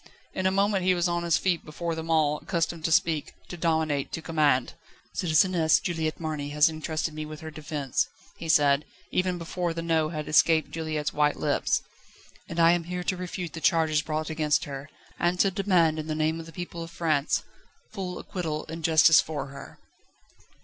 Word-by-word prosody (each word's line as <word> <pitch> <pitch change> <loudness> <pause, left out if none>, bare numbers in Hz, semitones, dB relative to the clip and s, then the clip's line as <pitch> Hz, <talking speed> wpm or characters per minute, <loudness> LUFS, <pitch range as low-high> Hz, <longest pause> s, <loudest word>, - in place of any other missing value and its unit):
In 185 0 0
a - - +2
moment 195 0 +2
he 185 0 +3
was 175 0 +1
on 175 0 0
his 170 -1 +2
feet 180 -4 0
before 165 +2 -4
them 160 0 -5
all, 150 -2 +2
accustomed 165 -1 -2
to 165 - 0
speak, 160 -2 +1
to - - -6
dominate, 160 -4 0
to 160 - -3
command. 150 -6 +2 0.4
"Citizeness 165 -1 +3
Juliette 160 -3 -2
Marny 155 -3 -3
has 150 +1 +4
entrusted 155 0 -3
me 155 0 -5
with 155 0 -8
her 160 0 -7
defence," 150 -3 -2 0.3
he 165 - -7
said, 145 -2 +4 0.3
even 180 -1 0
before 170 0 -3
the 165 - -3
No 160 -2 +1
had 155 -2 -5
escaped 160 +1 +4
Juliette's 155 -2 -3
white 150 0 +2
lips, - - 0 0.7
"and 170 - -4
I 165 0 +7
am 175 -1 0
here 180 +1 -4
to 185 - 0
refute 180 -1 -5
the 160 - -7
charges 160 -3 +3
brought 155 0 -3
against 155 -1 +1
her, 140 +1 -7 0.3
and 175 +1 +1
to 195 - +4
demand 180 -5 +2
in 155 - -5
the 155 - -2
name 155 +1 0
of 165 - -8
the - - -10
people 170 0 -6
of 165 - -6
France 155 -4 0 0.5
full 185 -4 -4
acquittal 160 -5 -4
and 165 0 -6
justice 160 -1 +6
for 150 -3 -5
her." 140 0 -11
160 Hz, 190 wpm, -27 LUFS, 155-170 Hz, 0.7 s, I